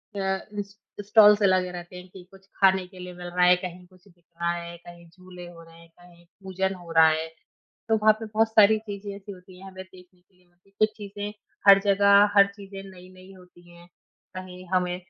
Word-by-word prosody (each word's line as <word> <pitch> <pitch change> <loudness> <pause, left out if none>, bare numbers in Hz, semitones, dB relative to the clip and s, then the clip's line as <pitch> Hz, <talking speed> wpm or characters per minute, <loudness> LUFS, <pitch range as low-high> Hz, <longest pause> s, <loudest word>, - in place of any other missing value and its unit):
अ, 190 -1 -2 0.2
इस 200 0 -8 0.3
स्टॉल्स 210 0 +5
लगे 185 -2 +2
रहते 175 0 -10
हैं 180 +1 -11
कि 185 -1 -14
कुछ 195 0 -19
खाने 190 -1 +2
के 185 -1 -16
लिए 180 0 -9
मिल 175 0 -10
रहा 180 0 +1
है, 180 - +6
कहीं 180 0 -9
कुछ 185 +1 -24
बिक 175 -2 -26 0.2
रहा 170 0 0
है, 170 0 -8
कहीं 170 0 -16
झूले 180 0 -13
हो 170 -1 -14
रहे 165 0 -18
हैं, 170 0 -19
कहीं 175 -1 -20 0.2
पूजन 190 0 -3
हो 175 -2 -13
रहा 160 -1 +6
है। 160 +1 -2 0.6
तो 220 - +2
वहाँ 215 0 +4
पे 225 - -6
बहुत 220 +1 0
सारी 220 0 +4
चीज़ें 205 -1 -8
ऐसी 200 0 -11
होती 180 0 -16
हैं 195 - -12
हमें 190 0 -10
देखने 180 -1 -20
के 185 +1 -39
लिए 180 -1 -31
मिलती 175 +2 -34
हैं। - - -42
कुछ 215 0 +2
चीज़ें 205 0 -7 0.4
हर 195 0 +8
जगह 200 +1 +4
हर 200 0 +7
चीज़ें 195 -1 -10
नई-नई 185 +1 -16
होती 175 -1 -20
हैं, 170 0 -17 0.5
कहीं 185 0 -10
हमें 180 -1 0
185 Hz, 220 wpm, -24 LUFS, 175-200 Hz, 0.6 s, हर